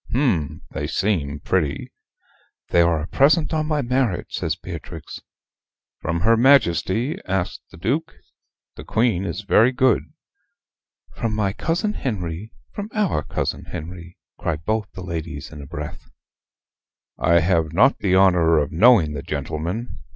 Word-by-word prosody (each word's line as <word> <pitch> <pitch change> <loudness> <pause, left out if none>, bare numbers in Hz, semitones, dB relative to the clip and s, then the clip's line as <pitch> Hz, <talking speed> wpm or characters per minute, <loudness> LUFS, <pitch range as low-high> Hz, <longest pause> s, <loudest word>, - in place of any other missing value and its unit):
"Hm! 90 - 0
they 75 - -3
seem 75 -8 -1
pretty." 70 -2 -1 0.8
"They 85 - +4
are 85 -2 +2
a - - -5
present 155 +4 +3
on 155 -1 0
my 150 -2 0
marriage," 125 -6 0
says - - -2
Beatrix. - - -8 0.8
"From 85 +1 -2
her 115 +5 +4
Majesty?" 115 - +3
asks 95 -1 -2
the - - -14
Duke. - - -2 0.6
"The - - -8
Queen 110 -5 +1
is 100 - -3
very 110 +4 +4
good." 130 -2 +3 1.1
"From 110 -2 -2
my 100 -3 0
cousin 175 - -1
Henry 100 - -4 0.2
from 205 +1 -6
our 200 - +1
cousin - - -3
Henry" 85 +1 -8 0.2
cry 85 - -1
both 105 +7 -2
the 95 - -8
ladies 80 -4 -5
in 75 -2 -9
a 70 - -10
breath. - - -7 1.1
"I 85 +1 +4
have 80 -2 +1
not 100 +11 +4
the 95 -2 +2
honor 90 -4 +5
of 75 +3 0
knowing 90 -4 +5
the 70 - -4
gentleman. 85 +14 -4
95 Hz, 145 wpm, -22 LUFS, 80-120 Hz, 1.1 s, honor